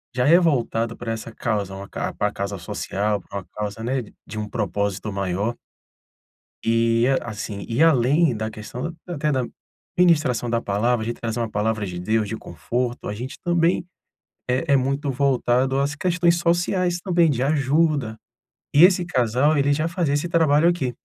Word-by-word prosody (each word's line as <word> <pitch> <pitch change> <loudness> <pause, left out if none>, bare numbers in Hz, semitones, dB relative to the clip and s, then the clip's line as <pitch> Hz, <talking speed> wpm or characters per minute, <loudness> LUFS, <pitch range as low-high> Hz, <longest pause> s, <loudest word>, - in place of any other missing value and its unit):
já 125 +2 +2
é 170 +3 +7
voltado 115 -8 0
para 115 -1 -5
essa 115 0 -5
causa, 105 -4 -2
uma 100 +1 -8
ca - - -4
para - - -1
causa 100 0 -4
social, 100 +4 -2
para 100 - -6
uma 95 - -12
causa, 105 +1 -4
né, 125 +1 -1 0.2
de 110 - -8
um 105 0 -3
propósito 100 -1 -2
maior. 100 +4 -2 1.1
E 115 +1 +3 0.2
assim, 105 -3 -6
e 120 +7 +1
além 145 -1 +4
da 110 +1 -3
questão 125 +10 -6
até 155 -3 -1
da 130 -3 0 0.5
ministração 155 -9 +3
da 115 -1 +1
palavra, 110 +4 0
a 110 - -4
gente 120 - -4
traz 115 -1 -3
uma 115 -2 -2
palavra 105 0 -1
de 90 -1 -5
Deus, 110 +3 0
de 110 - -3
conforto, 120 - -4
a 105 - -3
gente 125 +6 -6
também 175 0 +2 0.6
é 125 +3 +1
é - - +6
muito 140 +2 0
voltado 130 0 +1
às 145 +1 0
questões 175 0 +2
sociais 175 +1 +1
também 175 -4 +3
de 130 -3 0
ajuda. 145 -4 +1 0.6
E 150 - +7
esse 180 -1 +5
casal 130 0 +2
ele 140 +1 +2
já 155 +3 0
fazia 170 -4 -1
esse 145 +4 0
trabalho 160 -2 +3
aqui. 135 -9 0
125 Hz, 175 wpm, -23 LUFS, 110-155 Hz, 1.1 s, é